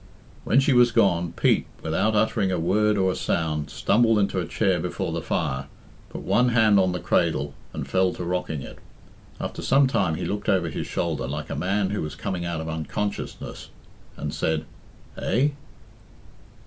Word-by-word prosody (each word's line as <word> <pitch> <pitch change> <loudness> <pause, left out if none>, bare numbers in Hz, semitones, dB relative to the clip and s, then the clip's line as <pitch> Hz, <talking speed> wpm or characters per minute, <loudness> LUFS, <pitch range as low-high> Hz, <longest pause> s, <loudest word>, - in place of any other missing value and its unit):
When 125 - +4
she 140 0 +3
was 120 -1 +5
gone, 85 -5 +2
Pete, - - +2 0.2
without 105 +7 +1
uttering 105 -2 +2
a 90 - 0
word 105 +5 +2
or 95 -1 +2
a - - -3
sound, 80 -4 -1
stumbled 115 0 +3
into 100 -2 +1
a 85 - -3
chair 95 -5 +1
before - - -3
the - - -2
fire, 65 +1 -2 0.4
put - - -7
one 125 0 +3
hand 110 -4 +5
on 95 -1 +3
the 90 - -3
cradle, 70 0 +1 0.2
and - - -5
fell 95 -1 +2
to - - -6
rocking 85 -5 -2
it. - - -10 0.6
After - - -5
some 135 +1 +4
time 100 -11 +1
he 90 - -4
looked 105 0 -2
over 90 -4 +2
his - - -4
shoulder, 80 -7 -2
like 75 +2 -5
a - - -2
man 95 +1 0
who 105 - -2
was 75 - -5
coming 90 -3 -3
out 85 -1 -2
of 80 - -6
unconsciousness, 80 +6 -4 0.5
and - - -4
said, 80 -1 -1 0.5
"Eh?" 135 +5 +2
95 Hz, 180 wpm, -25 LUFS, 80-105 Hz, 0.6 s, was